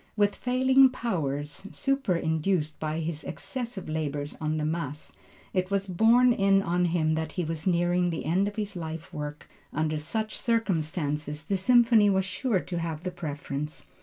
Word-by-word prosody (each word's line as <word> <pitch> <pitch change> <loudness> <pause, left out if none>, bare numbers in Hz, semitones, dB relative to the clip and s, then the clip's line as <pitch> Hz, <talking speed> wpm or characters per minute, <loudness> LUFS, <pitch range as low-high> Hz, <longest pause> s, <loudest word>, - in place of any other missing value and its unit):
With 205 -1 +2
failing 260 +1 +4
powers 155 - -3
superinduced 170 - 0
by 155 +1 -2
his 160 -1 -3
excessive 235 -7 -4
labors 150 -2 -3
on 155 0 0
the 150 - -1
Mass, 155 -2 -3 0.4
it 185 0 0
was 200 0 0
being 185 - -6
borne 245 +1 +6
in 195 -2 +3
on 175 0 +1
him 165 -2 +1
that 160 0 -2
he 180 - -1
was 160 +1 -4
nearing 175 0 +2
the 165 - -4
end 185 +6 +2
of 205 - -5
his 210 -2 -3
life 165 -1 -6
work. 150 0 -6 0.2
Under 155 0 -1
such 215 +8 -3
circumstances 155 -8 -1
the 200 - 0
Symphony 230 +1 +5
was 190 -1 +2
sure 195 +2 0
to 175 -2 -4
have 165 -1 -4
the 180 - -2
preference. 150 -3 -5
175 Hz, 165 wpm, -28 LUFS, 155-205 Hz, 0.4 s, borne